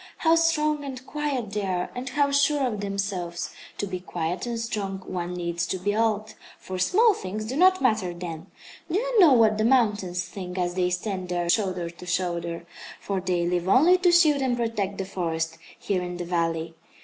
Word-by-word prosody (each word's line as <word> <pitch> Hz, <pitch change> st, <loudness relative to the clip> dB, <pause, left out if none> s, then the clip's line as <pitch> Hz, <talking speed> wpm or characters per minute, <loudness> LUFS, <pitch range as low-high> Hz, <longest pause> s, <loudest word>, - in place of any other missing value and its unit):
How 325 Hz, -1 st, +3 dB
strong 305 Hz, -3 st, +2 dB
and 260 Hz, -2 st, -7 dB
quiet 280 Hz, -9 st, -3 dB
they 210 Hz, 0 st, -2 dB
are, 185 Hz, -2 st, -2 dB
and 250 Hz, +1 st, -5 dB
how 280 Hz, +1 st, +1 dB
sure 280 Hz, 0 st, +3 dB
of 215 Hz, -5 st, -2 dB
themselves! 195 Hz, -4 st, -3 dB, 0.3 s
To -, -, -1 dB
be 185 Hz, -2 st, -4 dB
quiet 175 Hz, +2 st, -3 dB
and 235 Hz, -1 st, -2 dB
strong 210 Hz, -4 st, -3 dB
one 180 Hz, -1 st, -4 dB
needs 170 Hz, -1 st, -2 dB
to 190 Hz, -, -1 dB
be 205 Hz, +3 st, -1 dB
old, 215 Hz, -1 st, 0 dB, 0.2 s
for 185 Hz, -1 st, -6 dB
small 430 Hz, -, +4 dB
things 210 Hz, -, -5 dB
do 245 Hz, +4 st, -4 dB
not 370 Hz, +1 st, +4 dB
matter 215 Hz, -7 st, +2 dB
then. 170 Hz, 0 st, -7 dB, 0.4 s
Do 330 Hz, -, -1 dB
you -, -, +1 dB
know 335 Hz, -8 st, +8 dB
what 220 Hz, -3 st, +4 dB
the -, -, +2 dB
mountains 210 Hz, -7 st, +2 dB
think, 180 Hz, -2 st, -7 dB
as 175 Hz, -1 st, 0 dB
they 180 Hz, 0 st, +1 dB
stand 185 Hz, 0 st, -3 dB
there 175 Hz, -1 st, -1 dB
shoulder 180 Hz, -4 st, 0 dB
to 170 Hz, +1 st, -12 dB
shoulder 170 Hz, -2 st, -2 dB, 0.3 s
for 195 Hz, -2 st, -3 dB
they 180 Hz, -2 st, 0 dB
live 175 Hz, +1 st, 0 dB
only 320 Hz, -, +6 dB
to 360 Hz, -1 st, +4 dB
shield 310 Hz, -5 st, +5 dB
and 255 Hz, -2 st, +1 dB
protect 215 Hz, -4 st, -2 dB
the 195 Hz, -, -3 dB
forest, 165 Hz, -3 st, -3 dB, 0.2 s
here 190 Hz, -3 st, -1 dB
in 180 Hz, 0 st, -5 dB
the 175 Hz, -, -4 dB
valley. 165 Hz, -1 st, -1 dB
195 Hz, 195 wpm, -25 LUFS, 180-255 Hz, 0.4 s, know